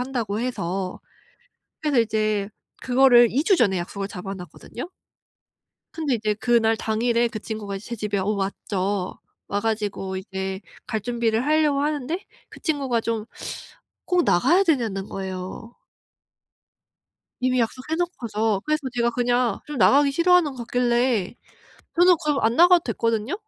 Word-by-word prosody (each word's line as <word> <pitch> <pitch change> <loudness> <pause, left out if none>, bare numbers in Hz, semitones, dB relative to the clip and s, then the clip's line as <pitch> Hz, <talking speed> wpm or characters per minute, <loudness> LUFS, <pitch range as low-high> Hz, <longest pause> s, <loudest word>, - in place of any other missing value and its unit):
한다."고 235 -5 -2
해서 190 -6 -3 0.8
그래서 285 -6 +3
이제 215 -2 0 0.3
그거를 245 -2 +6
2 280 +6 +1
주 390 - +5
전에 200 - +2
약속을 195 +3 -4
잡아 195 +1 -6
놨거든요. 195 - -9 1.0
근데 300 -6 -1
이제 215 -2 0
그날 225 0 +2
당일에 235 +2 +1
그 220 - -6
친구가 205 -2 -5
제 235 +4 -7
집에 205 -1 -2
어 190 - -1
왔죠. 195 -1 -2 0.3
와 205 0 -1
가지고 205 -3 -2
이제 190 0 -4 0.3
갈 220 - -2
준비를 235 0 0
하려고 300 -2 +3
하는데 295 +3 -1 0.3
그 - - -13
친구가 275 -7 0
좀 225 -1 -2 0.8
"꼭 360 -2 +2
나가야 340 - +4
되냐?"는 225 - 0
거예요. 190 +4 -6 1.7
이미 255 -1 +2
약속해 255 +6 -2
놓고서. 225 - -1
그래서 305 -1 0
제가 235 -1 +2
그냥 245 -2 +1
좀 295 -2 -6
나가기 280 +4 +5
싫어하는 345 -2 +4
거 255 - -12
같길래 240 -4 +1 0.6
저는 360 0 +7
그럼 295 -2 +1
안 225 +1 +2
나가도 350 0 +6
됐거든요. 230 - -1
230 Hz, 290 characters per minute, -24 LUFS, 205-270 Hz, 1.7 s, 저는